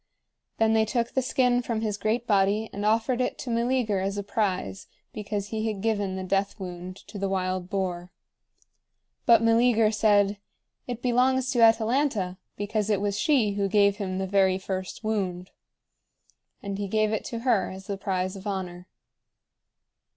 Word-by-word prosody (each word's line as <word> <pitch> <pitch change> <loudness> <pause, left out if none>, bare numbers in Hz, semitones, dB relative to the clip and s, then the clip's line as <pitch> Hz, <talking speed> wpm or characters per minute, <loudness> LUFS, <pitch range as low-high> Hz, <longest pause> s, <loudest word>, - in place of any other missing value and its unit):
Then 225 0 +3
they 220 0 +4
took 235 +1 -1
the 265 - +1
skin 250 -1 +2
from 230 -2 -2
his 215 -2 -1
great 220 +3 -1
body 205 +1 +2
and 205 - -4
offered 230 +4 +1
it 250 - -1
to 245 - -5
Meleager 235 -3 +1
as 195 +1 -2
a 200 - -2
prize, 185 - -2 0.3
because 205 -1 -4
he 220 0 -2
had 210 -3 -4
given 205 -4 0
the 190 - -4
death 195 +2 -1
wound 180 0 -7
to 205 - -8
the 195 0 -1
wild 185 -1 -2
boar. 180 -2 -3 1.2
But 230 -1 +6
Meleager 230 -1 +4
said: 205 -2 +3 0.5
"It 245 -1 -5
belongs 255 +1 +2
to 245 -3 +1
Atalanta, 225 -4 +2 0.2
because 210 +1 -2
it 205 -3 +2
was 200 0 -1
she 250 -8 +3
who 200 0 0
gave 200 0 +3
him 190 -3 -3
the 190 - -1
very 190 -1 +3
first 190 +2 -5
wound." 185 -4 -2 1.1
And 200 0 -4
he 200 - -2
gave 215 +1 +1
it 220 - -1
to 230 -1 -5
her 230 -7 +2
as 190 0 -9
the 200 - -3
prize 185 -1 -2
of 195 +1 -8
honor. 180 -2 -4
205 Hz, 170 wpm, -26 LUFS, 190-225 Hz, 1.2 s, But